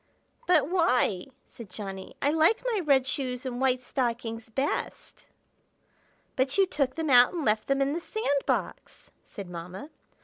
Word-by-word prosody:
"But 315 -6 +4
why?" 255 - +1 0.2
said 230 -5 -12
Johnny. 195 -1 -7
"I 285 - +3
like 320 +10 +3
my 425 - +1
red 280 -6 +3
shoes 260 -1 -3
and 250 -1 -4
white 255 -1 +1
stockings 235 -4 -3
best." 270 +6 -4 1.1
"But 265 +3 +1
you 390 - +5
took 280 -7 -1
them 320 -3 -1
out 245 +3 +7
and 335 -4 -3
left 215 0 +1
them 275 0 +2
in 275 +1 -1
the 335 - -2
sand 285 -9 -1
box!" - - -3 0.2
said 200 -2 -8
Mamma. 180 - -8
265 Hz, 160 wpm, -27 LUFS, 230-300 Hz, 1.1 s, out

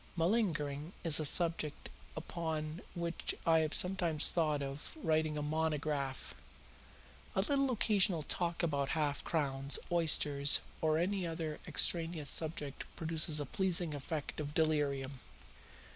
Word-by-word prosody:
Malingering 165 -5 0
is 165 -3 +2
a 155 - -1
subject 165 -1 +2 0.3
upon 160 -1 -4
which 170 -1 -2
I 165 -1 +5
have 155 -1 +1
sometimes 175 -5 +3
thought 155 -4 0
of 140 - -6
writing 155 -1 +1
a 150 - -2
monograph. 150 -3 -2 1.0
A 190 - +3
little 275 +5 +1
occasional 200 -8 +2
talk 170 +2 -1
about 140 -4 0
half 145 -2 -1
crowns, 140 -4 0
oysters, 150 -4 +4 0.2
or 155 -1 +2
any 185 +1 0
other 160 -2 -4
extraneous 165 -4 +2
subject 155 -4 0
produces 160 -1 0
a 145 - -2
pleasing 175 +1 0
effect 145 +2 -5
of 150 0 -5
delirium." 140 -4 0
155 Hz, 125 wpm, -34 LUFS, 145-170 Hz, 1.0 s, I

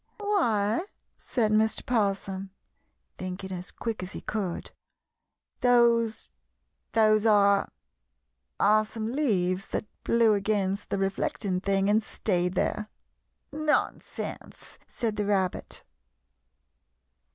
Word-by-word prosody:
"Why," 325 - +1 0.3
said 220 -4 0
Mr. 220 +1 +2
'Possum, 195 -4 -1 0.7
thinking 185 +1 -5
as 180 -1 -6
quick 225 -4 -4
as 180 +1 -6
he - - -6
could, 195 -6 -3 0.9
"those 235 -2 +3 0.7
those 215 -1 +4
are 200 -2 +4 0.9
are 215 +1 +5
some 220 +1 -5
leaves 195 -9 0
that - - -3 0.2
blew 230 -2 +4
against 200 -1 0
the - - -1
reflecting 195 0 -1
thing 195 0 +1
and 210 +2 +4
stayed 180 -4 -1
there." 210 +3 -1 0.6
[Illustration: 310 +1 -5
"'NONSENSE!" 300 - -2
SAID 225 -3 -3
THE 210 - 0
RABBIT. 190 -3 -1
210 Hz, 105 wpm, -27 LUFS, 195-225 Hz, 0.9 s, are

